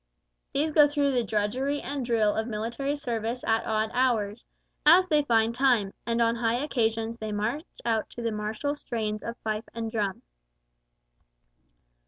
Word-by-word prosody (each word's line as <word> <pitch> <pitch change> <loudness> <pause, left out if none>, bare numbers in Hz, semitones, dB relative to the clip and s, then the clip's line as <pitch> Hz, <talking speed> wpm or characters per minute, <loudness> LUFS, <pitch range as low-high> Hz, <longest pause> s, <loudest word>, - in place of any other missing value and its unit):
These 305 +3 0
go 295 -1 +7
through 285 -1 +1
the 245 -2 +1
drudgery 230 +7 -1
and 280 -2 -4
drill 225 -3 +2
of 220 +1 -2
military 235 +6 -2
service 240 -3 -3
at 225 0 +1
odd 220 0 0
hours, 235 -4 +1 0.4
as 345 +5 +7
they 305 -4 +3
find 230 -4 +2
time, 240 -6 +2
and 230 0 +1
on 230 0 +2
high 230 0 +1
occasions 230 -4 -1
they 215 -1 -4
march 220 +10 -2 0.2
out 225 -2 0
to 240 - -8
the 230 - 0
martial 215 +7 -2
strains 215 -6 -3
of 235 +1 -6
fife 215 0 -2
and 225 -1 -3
drum. 205 -4 -2
230 Hz, 160 wpm, -27 LUFS, 220-270 Hz, 0.4 s, go